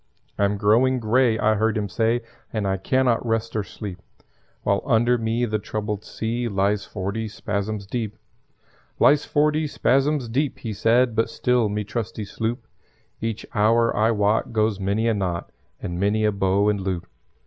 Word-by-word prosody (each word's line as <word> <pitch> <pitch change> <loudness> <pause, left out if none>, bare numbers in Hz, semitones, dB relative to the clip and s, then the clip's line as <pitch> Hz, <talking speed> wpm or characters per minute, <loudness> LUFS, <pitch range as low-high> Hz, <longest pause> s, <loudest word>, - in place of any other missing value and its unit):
"I'm 100 0 +2
growing 120 +6 +3
grey," 115 +1 +3
I 110 0 +3
heard 110 +1 +1
him 105 -1 -1
say, 115 +4 +1 0.3
"And 110 -3 -2
I 95 0 0
can 130 +7 +1
not 120 -2 +2
rest 115 -1 -1
or 110 - +1
sleep 95 0 -8 0.6
While - - +1
under 120 +2 +3
me 115 +2 0
the 110 -2 -1
troubled 105 0 -4
sea 120 +2 -3
Lies 100 0 0
forty 105 +3 -3
spasms 105 0 -3
deep. 110 0 -4 0.8
"Lies 145 0 +4
forty 150 +1 +2
spasms 135 0 +1
deep," 135 +5 -1
he 110 -3 -5
said; 120 +3 +3
"But 115 - +1
still 125 -3 +1
me 105 +1 -2
trusty 105 0 -4
sloop 115 +3 -3 0.6
Each 115 -1 -3
hour, 115 +2 +3
I 110 +1 +3
wot, 105 0 +1
goes 110 -2 +1
many 100 +4 0
a 115 - +3
knot 90 -4 -3 0.3
And 90 0 -4
many 105 +2 +2
a 105 - +3
bow 100 0 +1
and 105 -2 +1
loop. 95 -2 -3
110 Hz, 170 wpm, -23 LUFS, 100-115 Hz, 0.8 s, Lies